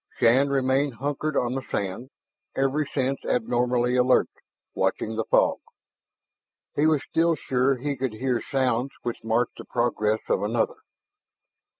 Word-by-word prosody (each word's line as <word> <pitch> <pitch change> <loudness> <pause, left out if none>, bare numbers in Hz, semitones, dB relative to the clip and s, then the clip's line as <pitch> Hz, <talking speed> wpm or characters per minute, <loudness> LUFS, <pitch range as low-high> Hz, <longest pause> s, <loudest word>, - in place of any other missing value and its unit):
Shann 130 +5 +4
remained 135 0 +1
hunkered 145 +4 -2
on 120 0 +1
the 135 - -2
sand, 100 +3 -4 0.5
every 135 +2 +1
sense 135 -1 -2
abnormally 125 +1 +1
alert, 125 0 +4 0.4
watching 110 - -1
the 115 - -1
fog. - - +3 1.2
He 150 +2 +3
was 155 -3 +2
still 165 0 +2
sure 135 -1 +1
he 140 +3 -2
could 130 -3 -2
hear 125 +1 -1
sounds 130 -1 0
which 120 - -4
marked 115 +2 0
the - - -6
progress 110 -3 0
of - - +1
another. 110 +3 0
125 Hz, 135 wpm, -25 LUFS, 120-140 Hz, 1.2 s, Shann